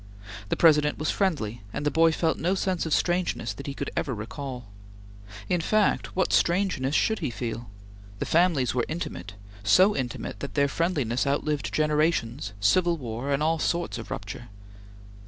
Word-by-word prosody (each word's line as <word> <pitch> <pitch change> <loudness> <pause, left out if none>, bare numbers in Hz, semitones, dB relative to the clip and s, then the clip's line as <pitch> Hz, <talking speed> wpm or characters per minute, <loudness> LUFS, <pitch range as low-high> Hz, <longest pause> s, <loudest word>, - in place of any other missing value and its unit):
The - - +1
President 150 -3 +4
was 155 - 0
friendly, 125 - -1
and 145 - -4
the 145 - +2
boy 165 0 +4
felt 160 0 0
no 180 +4 +1
sense 185 -3 -1
of - - -5
strangeness 175 0 0
that 140 - -9
he 140 - -4
could - - -4
ever 135 -6 -1
recall. 125 +3 -6 0.8
In 175 -2 +1
fact, 215 +4 +1
what 185 - +1
strangeness 170 -7 +2
should 220 -1 +2
he 150 - -2
feel? 115 -2 -5 0.5
The - - -3
families 160 - +2
were 125 -1 +1
intimate; 105 - -5 0.3
so 185 - +5
intimate 125 -3 -4
that 140 - -6
their 140 -1 +3
friendliness 140 -6 0
outlived 145 +1 -1
generations, 150 - 0
civil 170 - +3
war, 125 0 -4
and 140 +2 +1
all 160 +1 +1
sorts 155 -11 -1
of 115 - -8
rupture. 105 +4 -6
150 Hz, 165 wpm, -26 LUFS, 120-170 Hz, 0.8 s, so